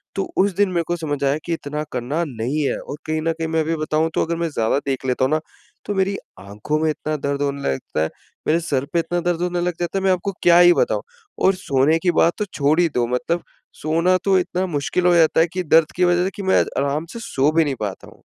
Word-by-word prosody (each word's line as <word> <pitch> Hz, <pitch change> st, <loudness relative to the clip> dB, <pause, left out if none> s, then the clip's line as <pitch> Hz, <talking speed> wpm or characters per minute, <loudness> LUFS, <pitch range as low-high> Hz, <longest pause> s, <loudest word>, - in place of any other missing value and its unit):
तो 195 Hz, -, 0 dB
उस 195 Hz, -1 st, +2 dB
दिन 205 Hz, -1 st, +2 dB
मेरे 170 Hz, -2 st, 0 dB
को 175 Hz, -, 0 dB
समझ 145 Hz, -4 st, -3 dB
आया 140 Hz, +2 st, +2 dB
कि 170 Hz, -, -1 dB
इतना 150 Hz, -1 st, -4 dB
करना 130 Hz, +7 st, -2 dB
नहीं 130 Hz, +4 st, -2 dB
है -, -, -1 dB
और 145 Hz, -, -7 dB
कहीं 155 Hz, 0 st, -1 dB
न 165 Hz, +1 st, 0 dB
कहीं 160 Hz, 0 st, -4 dB
मैं 160 Hz, 0 st, 0 dB
अभी 160 Hz, +1 st, -1 dB
बताऊँ 155 Hz, +1 st, 0 dB
तो -, -, +1 dB
अगर 170 Hz, +1 st, -2 dB
मैं 170 Hz, -1 st, -1 dB
ज़्यादा 115 Hz, -2 st, 0 dB
देख 135 Hz, -1 st, -2 dB
लेता 130 Hz, 0 st, +1 dB
हूँ 130 Hz, -, -1 dB
ना 155 Hz, -, +2 dB, 0.5 s
तो 205 Hz, -, -2 dB
मेरी 195 Hz, +1 st, +1 dB, 0.2 s
आँखों 105 Hz, +10 st, -3 dB
में 160 Hz, 0 st, +1 dB
इतना 155 Hz, 0 st, -2 dB
दर्द 140 Hz, 0 st, -2 dB
होने 140 Hz, 0 st, -1 dB
लगता 70 Hz, +3 st, -2 dB
है, 80 Hz, -, -1 dB, 0.4 s
मेरे 165 Hz, +2 st, +3 dB
सर 140 Hz, -5 st, -1 dB
पे 170 Hz, -, +3 dB
इतना 175 Hz, +1 st, -1 dB
दर्द 175 Hz, -1 st, -1 dB
होने 180 Hz, 0 st, -1 dB
लग 175 Hz, 0 st, 0 dB
जाता 175 Hz, +2 st, -2 dB
है -, -, -6 dB
मैं 190 Hz, -, +3 dB
आपको 185 Hz, +2 st, -1 dB
क्या 175 Hz, 0 st, +6 dB
ही 175 Hz, 0 st, +8 dB
बताऊँ -, -, +1 dB, 0.4 s
और 190 Hz, 0 st, +4 dB
सोने 150 Hz, -1 st, +2 dB
की 180 Hz, -1 st, +2 dB
बात 170 Hz, -, +4 dB
तो 210 Hz, -, -1 dB
छोड़ 150 Hz, +3 st, +2 dB
ही 175 Hz, -, +4 dB
दो। 120 Hz, -1 st, +2 dB
मतलब 165 Hz, +8 st, -1 dB, 0.4 s
सोना 165 Hz, +4 st, +2 dB
तो 195 Hz, -1 st, +4 dB
इतना 180 Hz, +1 st, -1 dB
मुश्किल 165 Hz, +3 st, -1 dB
हो 175 Hz, -, +5 dB
जाता 160 Hz, -1 st, +4 dB
है 165 Hz, -, +3 dB
कि 185 Hz, 0 st, -2 dB
दर्द 160 Hz, -1 st, +4 dB
की 180 Hz, -, +1 dB
वज़ह 175 Hz, 0 st, +3 dB
से 190 Hz, -, 0 dB
कि 200 Hz, -, -6 dB
मैं 190 Hz, -, +4 dB, 0.2 s
आराम 140 Hz, +3 st, 0 dB
से 235 Hz, -, -6 dB
सो 140 Hz, -, +1 dB
भी 165 Hz, 0 st, +4 dB
नहीं 140 Hz, -, -1 dB
पाता 100 Hz, -3 st, -5 dB
हूँ। -, -, -18 dB
160 Hz, 260 wpm, -21 LUFS, 140-175 Hz, 0.5 s, ही